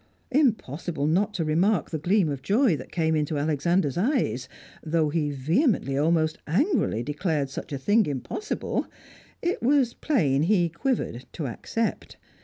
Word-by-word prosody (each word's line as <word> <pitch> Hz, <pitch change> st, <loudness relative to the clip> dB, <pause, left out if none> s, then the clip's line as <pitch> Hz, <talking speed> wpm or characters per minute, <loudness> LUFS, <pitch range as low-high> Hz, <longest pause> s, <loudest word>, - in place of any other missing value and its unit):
Impossible 180 Hz, -, 0 dB
not 185 Hz, +7 st, +2 dB
to 165 Hz, -, -1 dB
remark 175 Hz, +4 st, +1 dB
the 160 Hz, -, -2 dB
gleam 185 Hz, +3 st, +2 dB
of 140 Hz, -3 st, -3 dB
joy 210 Hz, -, +3 dB
that -, -, -9 dB
came 160 Hz, -2 st, +1 dB
into 150 Hz, 0 st, -1 dB
Alexander's 150 Hz, +2 st, +1 dB
eyes; 195 Hz, -, 0 dB, 0.3 s
though 160 Hz, -1 st, +1 dB
he 150 Hz, -1 st, 0 dB
vehemently, 155 Hz, -, +1 dB
almost 155 Hz, +2 st, +1 dB
angrily, 200 Hz, -, +1 dB
declared 150 Hz, -1 st, -1 dB
such -, -, -7 dB
a 140 Hz, -, -2 dB
thing 205 Hz, +10 st, +2 dB
impossible, 145 Hz, -, -3 dB, 0.6 s
it 350 Hz, +1 st, -1 dB
was 255 Hz, -1 st, +3 dB
plain 150 Hz, -, +1 dB
he 175 Hz, 0 st, +3 dB
quivered 170 Hz, -, -2 dB
to 160 Hz, -, -4 dB
accept. 220 Hz, -, -3 dB
165 Hz, 145 wpm, -26 LUFS, 145-215 Hz, 0.6 s, joy